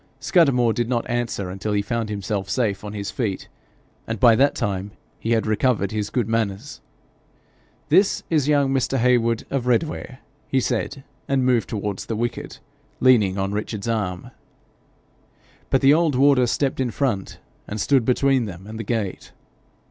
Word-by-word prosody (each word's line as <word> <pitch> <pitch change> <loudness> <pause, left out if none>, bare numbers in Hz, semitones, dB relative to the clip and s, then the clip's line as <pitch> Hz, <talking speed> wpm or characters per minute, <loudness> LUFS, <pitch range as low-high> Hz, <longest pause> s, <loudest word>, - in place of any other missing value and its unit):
Scudamore 125 - +3
did 120 0 -2
not 120 -2 -1
answer 115 -6 -2
until 95 +3 -3
he 100 0 +1
found 115 -1 -2
himself 100 -1 -3
safe 100 -2 -1
on 105 0 -6
his 100 -1 -4
feet, 105 -7 -3 0.6
and 115 -1 -3
by 115 0 +6
that 140 +4 +3
time 100 0 -2 0.3
he 115 - 0
had 115 - +1
recovered 110 -2 +1
his 105 -1 -2
good 120 -5 -1
manners. 115 +3 -2 1.1
'This 195 +1 +3
is 150 -4 +1
young 140 -2 +2
Mr. 135 0 0
Heywood 115 -2 +2
of 130 -3 -1
Redware,' 130 +1 -1 0.3
he 135 - +1
said, 130 +3 -2 0.2
and 135 -2 +1
moved 120 -5 +2
towards 105 -3 -4
the 115 - -2
wicket, 120 +2 -4 0.4
leaning 110 -7 +4
on 95 0 -1
Richard's 105 0 -4
arm. 100 -6 -2 1.4
But 135 - +2
the 135 +1 +6
old 160 -3 +2
warder 135 -1 +4
stepped 135 +3 -1
in 130 -2 0
front, 115 -6 -2 0.3
and 105 - -5
stood 130 +4 +3
between 130 +1 +2
them 95 -2 -9
and 110 +1 -8
the - - -3
gate. 105 -4 -3
115 Hz, 165 wpm, -22 LUFS, 105-130 Hz, 1.4 s, by